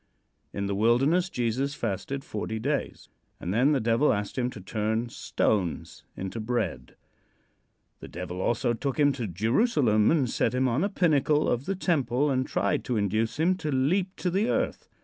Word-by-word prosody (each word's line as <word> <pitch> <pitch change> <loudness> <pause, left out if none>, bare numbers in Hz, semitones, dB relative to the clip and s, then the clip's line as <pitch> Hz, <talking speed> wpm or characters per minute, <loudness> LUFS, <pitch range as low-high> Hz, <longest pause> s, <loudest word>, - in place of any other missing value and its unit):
In 100 - -3
the 100 - -1
wilderness 135 - +3
Jesus 125 +2 -1
fasted 125 +5 -3
forty 110 +1 -4
days, 140 +6 -3 0.3
and 90 - -3
then 125 +7 +3
the 145 - +2
Devil 115 +5 +2
asked 100 0 -2
him 125 -1 0
to 110 - -9
turn 110 +4 -2
stones 95 -6 -2
into 95 +4 -5
bread. 110 -4 -3 1.0
The - - -9
Devil 90 +1 -6
also 120 +2 +1
took 135 +3 -3
him 145 -1 +5
to 125 -5 -4
Jerusalem 110 - +2
and 150 -6 +2
set 120 - 0
him 130 +1 +2
on 130 +7 +1
a 200 - +1
pinnacle 155 -5 +2
of 120 +3 0
the 195 - 0
temple, 145 -6 +1
and 130 0 0
tried 100 +2 0
to 125 - -1
induce 110 +5 0
him 170 +4 +3
to 155 -5 -3
leap 180 +9 +1
to 180 - -2
the 205 +6 +1
earth. - - -1
125 Hz, 175 wpm, -27 LUFS, 110-150 Hz, 1.0 s, him